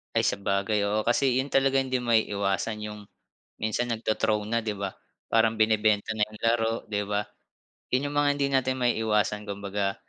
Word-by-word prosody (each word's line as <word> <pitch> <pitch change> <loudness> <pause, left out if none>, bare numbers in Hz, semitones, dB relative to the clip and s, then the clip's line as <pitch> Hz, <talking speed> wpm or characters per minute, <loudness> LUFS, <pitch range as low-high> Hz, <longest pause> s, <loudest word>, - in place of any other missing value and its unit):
Ay, - - +4
sabagay, 100 +1 0
oo, 105 +1 +1
kasi 125 +3 +2
'yon 140 - -6
talaga 135 0 +3
hindi 130 -1 -1
maiiwasan 105 -2 0
yung, 105 0 -7 0.6
minsan 115 +2 0
nagto-throw 110 -1 0
na, 115 - +1
'di 105 - -1
ba? 100 -1 -3 0.4
Parang 115 0 +3
binebenta 110 -1 +2
na 105 - +3
'yong 105 0 -14
laro, 115 -1 +2 0.2
'di 105 -1 -1
ba? 105 0 0 0.7
'Yon 140 +3 0
'yong - - -7
mga 145 0 +3
hindi 140 -1 +1
natin 130 -1 +1
maiiwasan 105 -3 +1
kumbaga, 100 0 -2
110 Hz, 165 wpm, -27 LUFS, 105-120 Hz, 0.7 s, Ay